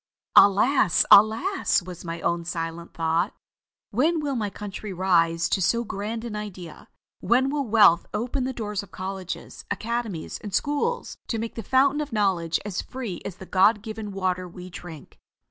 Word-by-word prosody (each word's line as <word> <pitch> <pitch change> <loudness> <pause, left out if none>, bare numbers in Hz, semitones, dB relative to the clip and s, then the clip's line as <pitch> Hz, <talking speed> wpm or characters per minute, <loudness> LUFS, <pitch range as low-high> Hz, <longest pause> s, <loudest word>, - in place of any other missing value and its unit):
"Alas! 200 - +5
alas!" 220 - +5
was 180 -1 -9
my 165 -1 -5
own 170 0 0
silent 165 0 -5
thought. 165 +4 0 0.6
"When 315 +10 +2
will 290 -2 -2
my 215 -4 -1
country 205 +1 -7
rise 165 -3 +2
to 190 - +1
so 235 +6 +2
grand 220 +2 -4
an 225 -3 -5
idea. 185 -6 -8 0.3
When 260 +3 +2
will 285 -3 -1
wealth 205 -6 +5
open 250 +5 -2
the 260 - -1
doors 210 -5 -3
of 200 - -13
colleges, 190 -1 -6
academies, 225 -7 -3
and 205 -2 -5
schools, 295 +12 -1
and 225 - -1
make 230 +1 -4
the 230 - -5
Fountain 270 +6 +3
of 295 - -5
Knowledge 190 -6 +1
as 200 -3 -3
free 235 -9 -6
as 190 - -5
the 190 - -11
God 200 +3 +3
given 220 -1 -6
water 185 -2 -2
we 180 +1 -10
drink." 165 -4 -11
205 Hz, 165 wpm, -25 LUFS, 180-235 Hz, 0.6 s, Alas